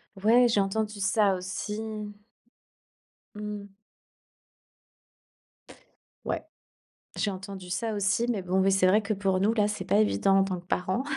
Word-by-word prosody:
Ouais, 230 +5 +4
j'ai 220 -3 +2
entendu 210 +1 -1
ça 195 +1 +3
aussi. 190 +3 -4 1.5
Mmh. 210 -1 -6 2.6
Ouais, - - -2 0.7
j'ai 210 - 0
entendu 190 -1 -8
ça 220 +5 -2
aussi, 205 +3 +1
mais 220 -5 0
bon, 185 +1 0
oui 195 +1 +3
,c'est 190 -1 +4
vrai 210 +4 +4
que, 215 0 -2
pour 190 -2 0
nous, 205 +4 +2
là, 210 -2 +2
c'est 210 -3 -4
pas - - +2
évident, 110 - +3
en - - +4
tant 185 -2 -3
que 175 - -17
parents, 185 +7 -1
200 Hz, 145 wpm, -27 LUFS, 190-210 Hz, 2.6 s, Ouais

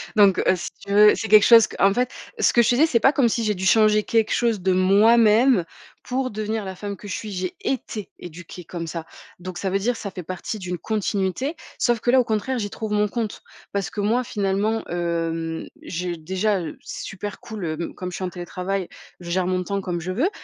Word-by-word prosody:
Donc 200 -3 +5
heu, 185 - +3
si 175 - -5 0.2
tu 200 - -6
veux, 210 +1 +7
c'est 220 - -4
quelque 210 0 +7
chose 230 -2 +8
qu'en 195 0 +2
fait, 250 +3 0 0.3
ce - - +4
que 235 - +5
je 225 - +2
te - - +3
disais, 310 +6 +5
c'est 240 -7 +2
pas 270 +6 +4
comme 245 -4 +3
si 230 - -1
j'ai 215 -1 +1
dû 190 0 -4
changer 215 +1 +5
quelque 225 0 +1
chose 230 -3 +1
de 185 +1 +1
moi-même 215 +3 +5 0.4
pour 255 0 -2
devenir 215 0 -3
la 190 0 -6
femme 200 +1 -6
que 205 - -11
je 200 - -4
suis. 215 - -6
J'ai 185 -1 -3
été 220 -5 -3
éduquée 175 +1 -10
comme 170 0 -6
ça. 165 0 -5 0.3
Donc 180 0 -7
ça 195 - -1
veut 195 - +1
dire, 235 +5 0
ça 200 - -5
fait 180 - -8
partie 185 +7 -5
d'une 180 -3 -5
continuité. 210 - -1 0.2
Sauf 240 -2 +1
que 240 - -2
là, 260 - +6
au - - +4
contraire, 230 +3 -1
j'y 205 -3 -3
trouve 220 -1 -5
mon 210 0 +2
compte 220 -1 -4 0.3
parce 200 -1 -2
que 210 - -3
moi, 230 +5 +1
finalement, 205 0 -1
hem, 165 -1 -2 0.2
j'ai 175 0 -4
déjà, 190 +5 0
heu, 165 - -6
c'est - - -7
super 205 +2 -6
cool, 215 -5 -7
heu, 160 +1 -4
comme 180 -1 -5
je - - -6
suis - - -5
en 185 - -1
télétravail, 180 +1 -4 0.3
je 175 -1 -9
gère 180 +1 +1
mon 185 0 0
temps 200 +1 -2
comme 175 -2 -3
je 180 +3 -4
veux 260 - +1
200 Hz, 235 wpm, -23 LUFS, 180-225 Hz, 0.4 s, chose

